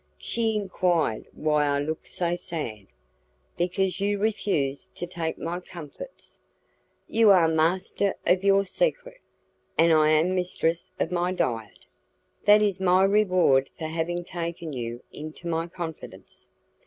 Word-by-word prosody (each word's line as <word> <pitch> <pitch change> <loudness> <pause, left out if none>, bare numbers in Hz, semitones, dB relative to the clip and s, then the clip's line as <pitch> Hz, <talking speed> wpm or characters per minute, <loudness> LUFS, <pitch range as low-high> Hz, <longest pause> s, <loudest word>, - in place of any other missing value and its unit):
She 225 -2 -1
enquired 180 - 0
why 150 -1 +1
I 140 0 +1
looked 155 +3 -4
so 175 -1 -1
sad. 120 - -5 0.7
"Because 180 +2 0
you 205 +1 +1
refuse 195 -10 -1
to - - -4
take 170 -2 -4
my 170 +2 -3
comfits." 180 - -11 0.7
"You 225 -1 +4
are 180 -4 +6
master 175 +5 +1
of 185 +1 +3
your 195 0 +4
secret, - - -1 0.6
and 165 +1 +5
I 155 -1 +5
am 155 +4 +3
mistress 175 -2 -1
of - - -1
my 175 0 0
diet." 115 - -3 0.6
"That 210 +1 +7
is 200 -2 0
my 185 0 +4
reward 185 -9 +3
for 160 - -5
having 165 +2 -2
taken 170 -3 -5
you 120 -1 -5
into 155 +3 -8
my 165 0 -1
confidence." 170 -2 -8
175 Hz, 135 wpm, -26 LUFS, 155-190 Hz, 0.7 s, That